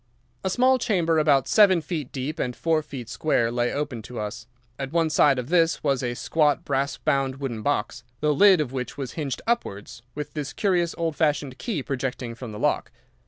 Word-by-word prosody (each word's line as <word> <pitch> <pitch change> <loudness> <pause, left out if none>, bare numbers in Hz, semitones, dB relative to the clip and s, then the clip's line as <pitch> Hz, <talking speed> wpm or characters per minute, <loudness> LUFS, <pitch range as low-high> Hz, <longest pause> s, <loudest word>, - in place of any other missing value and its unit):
"A 190 - 0
small 255 +5 +3
chamber 170 -8 +2
about 145 -4 +3
seven 200 -5 +5
feet 155 -4 -5
deep 145 +5 -4
and 125 -1 -2
four 160 -1 +1
feet 135 -6 -8
square 120 -3 0
lay 120 0 0
open 140 -5 -3
to 120 +2 -8
us. 110 +2 -5 0.3
At 135 -1 -4
one 165 -2 +1
side 145 -3 +4
of 125 0 -4
this 165 -2 +2
was 140 -4 +1
a 120 -1 -2
squat, 150 +2 +1
brass 140 +1 -1
bound 135 -3 0
wooden 135 -5 -4
box, 125 -2 -1 0.2
the 150 0 +2
lid 195 +2 +6
of 135 -5 -3
which 125 +1 -4
was 135 -4 -4
hinged 145 -5 -4
upwards, 120 - -2
with 150 0 -5
this 145 -4 -4
curious 175 +2 +1
old 165 -2 -1
fashioned 145 -4 0
key 190 - -3
projecting 125 -3 -3
from 120 -1 -8
the 105 - -7
lock. - - 0
145 Hz, 200 wpm, -25 LUFS, 125-165 Hz, 0.3 s, lid